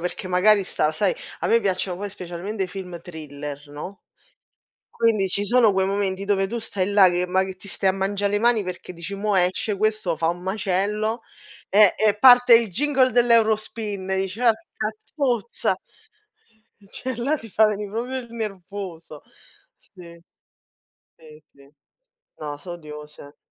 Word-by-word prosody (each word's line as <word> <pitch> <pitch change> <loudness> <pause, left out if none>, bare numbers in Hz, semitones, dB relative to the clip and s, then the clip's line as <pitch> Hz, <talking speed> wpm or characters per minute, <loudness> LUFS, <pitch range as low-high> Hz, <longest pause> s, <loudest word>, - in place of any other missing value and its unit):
perché 180 +2 -4
magari 195 +2 +4
stava 155 -3 0
sai 185 +5 0 0.3
a - - -1
me 230 0 +4
piacciono 185 -2 -1
poi 200 +1 -5
specialmente 190 +2 -5
film 180 -2 -8
thriller, 145 -3 -8
no, 150 +7 -8 0.9
quindi 215 -4 +1
ci 200 +2 -2
sono 235 -1 +4
quei 190 0 +2
momenti 195 -1 -1
dove 195 -1 +1
tu 235 - -4
stai 205 -4 -2
là 200 -2 +7
che 180 0 0
ma 185 +1 +2
ti 200 - -14
stai 195 -1 0
a - - +1
mangia' 195 +1 -2
le 205 +1 +1
mani 230 -2 +3
perché 180 0 -7
dici: 170 +3 -7
"Mo' 205 0 -1
esce, 185 +3 +1
questo 215 -5 0
fa 165 - +1
un 175 +1 -4
macello", 205 +4 -1 0.5
eh, 205 -1 +6
e 215 -1 +2
parte 245 0 +8
il 230 -3 +3
jingle 260 +4 +2
dell'Eurospin, 220 -4 +1
e 190 - +1
dice: 195 +5 -5
"Orca 225 -2 0
zozza!" 245 -6 -1 1.2
Cioè 260 -2 -5
là 275 +6 +1
ti 225 -6 -11
fa 220 +1 +4
venì 210 -1 -2
proprio 245 +5 -3
il 235 -2 -10
nervoso. 190 -7 -7 0.6
Sì, 170 -3 -15 1.0
sì, 155 -1 -16
sì. 140 0 -21 0.7
No, 150 -1 -5
so' 160 +5 -9
odiose. 150 -3 -11
200 Hz, 155 wpm, -23 LUFS, 180-220 Hz, 1.2 s, parte